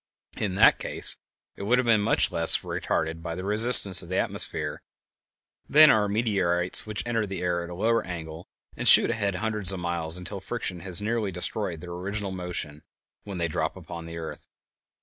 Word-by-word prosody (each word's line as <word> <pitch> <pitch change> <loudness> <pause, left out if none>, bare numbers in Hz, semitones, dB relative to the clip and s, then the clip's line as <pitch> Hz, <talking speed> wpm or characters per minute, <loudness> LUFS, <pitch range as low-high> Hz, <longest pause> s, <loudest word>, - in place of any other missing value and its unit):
In 95 -4 -3
that 100 - +5
case - - 0 0.4
it - - -11
would 115 +5 +1
have 125 - 0
been 110 -3 +2
less - - +1
retarded 80 0 0
by 85 0 -6
the 95 - -7
resistance 105 -2 +7
of 85 - -10
the 95 - -2
atmosphere - - -3 0.9
than 155 0 +7
are 105 -1 +1
meteorites 95 -5 0
which 105 -1 -4
enter 115 -3 -2
the 95 -1 -6
air 85 -1 -1
at 85 - -9
a 90 - -8
lower 115 +5 0
angle 80 -2 -8 0.3
and - - -4
shoot - - +7
ahead 100 -3 -2
hundreds 105 -1 -2
of 95 - -6
miles 85 -1 -1
until 95 +2 -6
friction 95 -4 -5
has 95 +2 +1
nearly 110 -2 -2
destroyed 90 -1 -4
their 90 0 -9
original 100 +3 -5
motion 90 -5 -6 0.4
when 100 -2 -7
they 85 -1 -1
drop 80 - -3
upon 85 -1 -10
the 85 0 -9
earth. 80 -1 -9
95 Hz, 185 wpm, -25 LUFS, 85-105 Hz, 0.9 s, resistance